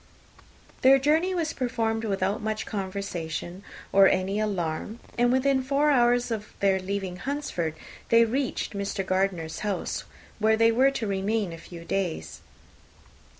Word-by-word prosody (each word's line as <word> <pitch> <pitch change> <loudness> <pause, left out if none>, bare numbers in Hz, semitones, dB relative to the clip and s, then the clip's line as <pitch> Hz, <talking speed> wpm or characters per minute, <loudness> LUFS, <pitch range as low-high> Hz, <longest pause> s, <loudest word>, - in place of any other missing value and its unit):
Their 265 +1 +7
journey 315 +7 +2
was 330 -3 -1
performed 225 -3 -1
without 195 -1 -1
much 215 0 -2
conversation, 190 -3 -4 0.3
or 195 0 +7
any 190 +2 0
alarm; 200 +1 -2 0.2
and 240 0 +3
within 265 +1 +2
four 280 +3 +2
hours 245 -2 +3
of 210 -2 -4
their 195 -1 +3
leaving 190 -1 -3
Hunsford 195 - -3 0.3
they 230 0 +6
reached 255 +1 -2
Mr. 200 -1 -3
Gardiner's 185 -4 -1
house, 205 -3 -3 0.3
where 220 +1 +3
they 230 0 +5
were 260 +4 +4
to 275 -4 -3
remain 200 -1 -1
a 165 - -9
few 170 0 -11
days. 160 - -3
210 Hz, 140 wpm, -26 LUFS, 190-245 Hz, 0.3 s, Their